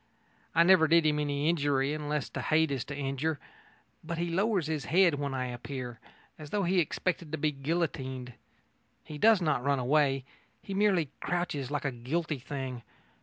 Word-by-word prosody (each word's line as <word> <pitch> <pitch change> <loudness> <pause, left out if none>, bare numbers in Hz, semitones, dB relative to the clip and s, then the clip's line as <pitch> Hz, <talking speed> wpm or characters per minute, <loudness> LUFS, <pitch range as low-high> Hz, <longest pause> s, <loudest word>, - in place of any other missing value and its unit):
I 165 - +7
never 175 -2 +6
did 165 0 +4
him 150 -1 +2
any 145 0 -1
injury 145 -4 +1
unless 150 -1 -2
to - - -5
hate 160 -1 +2
is 135 -4 -1
to 140 - -6
injure. 140 +2 -2 0.6
But 165 +1 -4
he 170 0 -1
lowers 195 -1 +1
his 155 -2 -2
head 180 0 +4
when 140 -2 -2
I 130 -1 -1
appear 125 -1 -6 0.4
as 150 -1 -9
though 205 +3 0
he 185 +1 +2
expected 170 0 -1
to - - 0
be 150 0 +1
guillotined. 135 -4 -3 0.7
He 150 -1 -8
does 215 -2 +5
not 150 -6 +1
run 140 0 +2
away: 135 0 +2 0.4
he 195 - -6
merely 190 -7 +2
crouches 175 -7 -2
like 145 0 -2
a 135 - +1
guilty 145 +5 -2
thing. 130 -2 -5
150 Hz, 175 wpm, -30 LUFS, 135-170 Hz, 0.7 s, I